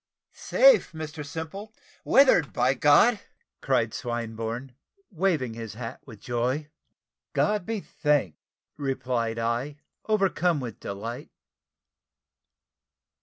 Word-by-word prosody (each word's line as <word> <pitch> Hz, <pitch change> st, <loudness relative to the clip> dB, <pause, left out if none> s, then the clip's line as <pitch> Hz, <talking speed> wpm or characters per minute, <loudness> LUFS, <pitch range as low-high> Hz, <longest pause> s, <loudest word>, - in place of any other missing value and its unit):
"Safe, -, -, +4 dB
Mr 155 Hz, -1 st, -6 dB
Simple! 165 Hz, +9 st, -7 dB, 0.3 s
weathered, 260 Hz, -, +5 dB
by 125 Hz, +2 st, +2 dB
God!" 150 Hz, -, +5 dB, 0.4 s
cried -, -, +1 dB
Swinburne, 115 Hz, +1 st, -4 dB, 0.4 s
waving 160 Hz, -, 0 dB
his 115 Hz, -2 st, -7 dB
hat 115 Hz, 0 st, -7 dB
with 110 Hz, -5 st, -11 dB
joy. 125 Hz, +6 st, -2 dB, 0.6 s
"God 210 Hz, -3 st, +1 dB
be 225 Hz, -3 st, -2 dB
thanked!" 145 Hz, -, 0 dB, 0.4 s
replied 130 Hz, -5 st, -2 dB
I, 120 Hz, +6 st, -2 dB, 0.3 s
overcome 190 Hz, -6 st, +2 dB
with 120 Hz, -7 st, -6 dB
delight. 110 Hz, +5 st, -6 dB
135 Hz, 95 wpm, -26 LUFS, 115-175 Hz, 0.6 s, weathered